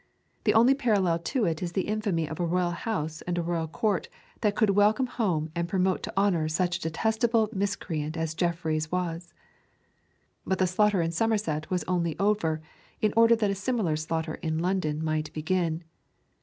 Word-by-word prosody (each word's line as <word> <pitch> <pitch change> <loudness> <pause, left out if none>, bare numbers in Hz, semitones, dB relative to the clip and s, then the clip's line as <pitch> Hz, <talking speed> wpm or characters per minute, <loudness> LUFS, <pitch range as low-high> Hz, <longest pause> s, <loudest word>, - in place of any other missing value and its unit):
The - - +4
only 235 +4 +6
parallel 205 -11 +2
to 220 +7 -1
it 165 -3 -1
is 175 -1 -3
the 190 - 0
infamy 205 -7 0
of 160 - -7
a - - +1
royal 175 +1 +1
house 160 -6 -3
and 175 -1 -1
a 170 - 0
royal 165 -1 -1
court 200 +4 -1 0.3
that 210 -2 +1
could 215 -4 +3
welcome 210 +5 +3
home 175 -11 -1
and 170 0 -2
promote 185 0 +1
to - - -6
honour 185 -6 +2
such 175 +2 0
a - - -16
detestable 220 +6 +1
miscreant 165 -6 -2
as 160 -1 -2
Jeffreys 160 -2 -1
was. 175 -1 -3 1.1
But 190 - 0
the 185 - +3
slaughter 190 0 +2
in 165 - -1
Somerset 170 -6 0
was 180 -1 0
only 170 -3 -1
over 180 -6 +1 0.4
in 215 -3 +1
order 230 0 +6
that 210 -3 +1
a - - +1
similar 195 -4 0
slaughter 160 +1 -2
in 160 -2 -1
London 165 -3 -1
might 155 -1 -1
begin. 165 +1 -1
180 Hz, 180 wpm, -27 LUFS, 160-205 Hz, 1.1 s, only